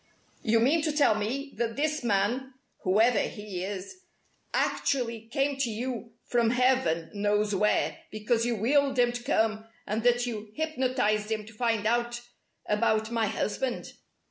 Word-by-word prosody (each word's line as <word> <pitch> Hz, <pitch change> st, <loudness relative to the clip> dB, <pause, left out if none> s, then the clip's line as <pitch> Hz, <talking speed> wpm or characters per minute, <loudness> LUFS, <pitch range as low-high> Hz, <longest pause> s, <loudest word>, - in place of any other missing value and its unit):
"You 225 Hz, 0 st, +3 dB
mean 285 Hz, +8 st, +3 dB
to 310 Hz, 0 st, 0 dB
tell 290 Hz, -6 st, +4 dB
me 250 Hz, +7 st, -3 dB
that 230 Hz, -1 st, -1 dB
this 305 Hz, 0 st, -1 dB
man 235 Hz, +5 st, 0 dB, 0.2 s
whoever 215 Hz, +4 st, +3 dB
he 205 Hz, -4 st, -4 dB
is 200 Hz, -, -6 dB, 0.5 s
actually 235 Hz, -5 st, 0 dB
came 275 Hz, +4 st, 0 dB
to 275 Hz, -3 st, 0 dB
you 230 Hz, 0 st, -4 dB
from 235 Hz, -2 st, +2 dB
heaven 250 Hz, -10 st, +2 dB
knows 210 Hz, 0 st, +1 dB
where 210 Hz, +2 st, +1 dB
because 215 Hz, +2 st, 0 dB
you 240 Hz, 0 st, 0 dB
willed 270 Hz, +5 st, +2 dB
him 245 Hz, -1 st, +4 dB
to 245 Hz, 0 st, -5 dB
come, 220 Hz, -1 st, +1 dB, 0.2 s
and 215 Hz, +2 st, -1 dB
that 245 Hz, +1 st, +3 dB
you 215 Hz, -3 st, -6 dB
hypnotized 255 Hz, -9 st, 0 dB
him 215 Hz, -1 st, -2 dB
to 220 Hz, -, -13 dB
find 225 Hz, -1 st, 0 dB
out 240 Hz, +1 st, +1 dB, 0.5 s
about 220 Hz, +1 st, +1 dB
my 225 Hz, -2 st, +1 dB
husband?" 240 Hz, +5 st, -2 dB
230 Hz, 150 wpm, -28 LUFS, 215-255 Hz, 0.5 s, tell